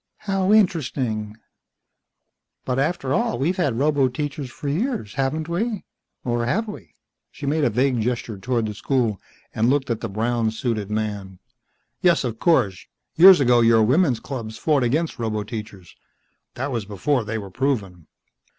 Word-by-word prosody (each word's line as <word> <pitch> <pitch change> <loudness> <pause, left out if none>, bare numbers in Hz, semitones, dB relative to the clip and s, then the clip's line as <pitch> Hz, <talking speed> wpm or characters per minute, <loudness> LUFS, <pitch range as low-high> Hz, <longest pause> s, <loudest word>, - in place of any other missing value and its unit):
"Haow 195 -2 0
interesting. 130 - +1 1.3
But 125 +1 -1
after 140 -2 0
all, 120 - 0
we've 160 +9 0
had 145 -10 +1
roboteachers 140 0 0
for 145 - -8
years, 165 - -2
haven't 140 +4 -1
we 205 +5 -2 0.4
or 120 -1 -1
have 220 - 0
we 210 - -10 0.2
?" - - -59
She 145 - -8
made 150 +2 +1
a 125 - +4
vague 125 +1 +1
gesture 115 -3 -3
toward 115 +2 -1
the 105 - -4
school, 115 -2 -1 0.3
and 115 +2 +2
looked 140 -1 +1
at 115 - -1
the 115 - -3
brown 115 +2 0
suited 110 -2 -3
man. 105 -3 -3 0.6
"Yes, 175 -5 +3
of 115 -3 -4
course. 105 - +2 0.3
Years 185 +1 +9
ago 125 -3 +4
your 115 -1 +5
women's 130 +1 +3
clubs 115 -5 -6
fought 150 -4 +2
against 140 +5 0
roboteachers. 105 -4 -5 0.6
That 135 +3 -3
was 115 -4 -2
before 120 +6 0
they 110 +1 -3
were 100 -3 -7
proven." 100 - -2
125 Hz, 155 wpm, -23 LUFS, 110-150 Hz, 1.3 s, Years